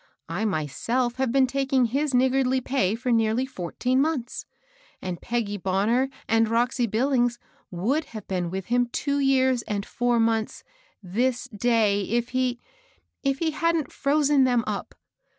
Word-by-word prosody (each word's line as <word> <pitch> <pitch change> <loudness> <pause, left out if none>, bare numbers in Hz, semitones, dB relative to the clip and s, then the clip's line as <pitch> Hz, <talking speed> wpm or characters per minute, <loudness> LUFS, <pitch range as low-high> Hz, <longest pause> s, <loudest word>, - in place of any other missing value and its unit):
I 175 +6 -2
myself 220 - -1
have 260 -2 0
been 270 +1 +4
taking 265 -1 +1
his 275 +5 0
niggardly 260 0 +2
pay 240 -6 0
for 250 +2 -2
nearly 225 +2 +2
fourteen 255 +3 -2
mcmths; 280 -5 -1 0.5
and 180 -2 -5
Peggy 225 -4 -2
Bonner 205 +8 +1 0.2
and 225 0 +3
Roxy 240 +1 +1
Billings 240 +1 +1 0.3
would 235 - -1
have 215 -2 -9
been 180 -3 -2
with 190 +1 -4
him 245 0 +1
two 280 +4 -1
years 260 -2 +3
and 200 -1 -2
four 245 -1 0
months 225 -1 0 0.4
this 240 +7 -1
day^ 210 -2 +1
if 235 +2 0
he— 255 -1 0 0.6
if 275 -1 0
he 320 +1 0
hadn't 330 -2 0
frozen 285 -1 +2
them 245 -3 +2
up 210 -2 -4
245 Hz, 150 wpm, -25 LUFS, 215-265 Hz, 0.6 s, been